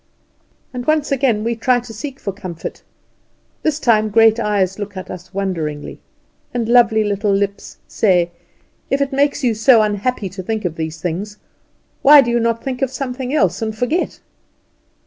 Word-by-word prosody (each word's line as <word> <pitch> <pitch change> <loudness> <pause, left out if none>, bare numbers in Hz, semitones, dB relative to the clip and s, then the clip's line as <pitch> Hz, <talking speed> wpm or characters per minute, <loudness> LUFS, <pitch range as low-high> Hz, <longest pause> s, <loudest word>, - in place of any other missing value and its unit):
And 245 -1 -6
once 310 -2 +1
again 250 -6 +1
we 235 +1 -1
try 245 +2 +2
to 235 -1 -11
seek 270 +5 -7
for 200 - -3
comfort. 185 -4 -7 0.8
This 310 -1 0
time 215 -5 +3
great 225 +1 +5
eyes 205 -3 0
look 205 -1 -6
at 185 - -7
us 180 0 -9
wondering, 165 -7 -4 0.6
and 235 -2 -1
lovely 230 -2 +4
little 205 0 0
lips 200 0 -2
say: 180 -5 +2 0.6
"If 275 - +1
it 280 0 0
makes 285 +1 +1
you 240 -3 +3
so 220 +1 +5
unhappy 210 +1 -1
to 190 +1 -7
think 215 +2 -3
of 165 -2 -2
these 160 0 -5
things, 185 +5 -4 0.6
why 290 +1 +9
do 240 -3 -1
you 240 - +2
not 230 0 0
think 260 -1 -4
of 270 - +1
something 260 -1 -4
else, 195 - +1
and 220 -1 -3
forget?" 280 +10 -1
220 Hz, 170 wpm, -18 LUFS, 195-250 Hz, 0.8 s, why